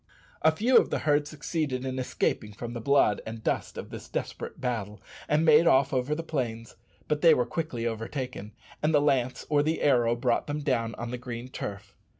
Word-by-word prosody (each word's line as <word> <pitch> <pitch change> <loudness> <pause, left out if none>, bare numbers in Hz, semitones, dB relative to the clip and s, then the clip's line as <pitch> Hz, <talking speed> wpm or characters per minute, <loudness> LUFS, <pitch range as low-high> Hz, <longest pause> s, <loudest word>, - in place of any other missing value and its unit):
A 160 - +5
few 230 +11 +3
of - - +4
the - - 0
herd 145 -1 +3
succeeded 150 -3 -3
in 130 0 -3
escaping 110 -4 -1
from 120 +3 -6
the 120 - -5
blood 140 -5 +3
and 110 0 -7
dust - - -2
of - - -7
this - - -9
desperate - - -5
battle, 110 -5 -3 0.3
and 155 +2 +3
made 155 +1 +6
off 135 -3 +4
over 130 +3 0
the 165 - -4
plains; 120 -8 -4 0.3
but 150 -1 0
they 165 -3 +7
were 125 - +1
quickly 125 -4 -3
overtaken, 115 -1 -4 0.3
and 155 +1 +2
the - - +6
lance 135 -4 +1
or 145 -1 +3
the 155 +2 -1
arrow 120 -4 +3
brought 120 0 0
them 150 +1 -3
down 120 -5 0
on 120 0 -5
the 125 - -4
green 120 0 -6
turf. 100 -4 -7
130 Hz, 200 wpm, -28 LUFS, 115-150 Hz, 0.3 s, they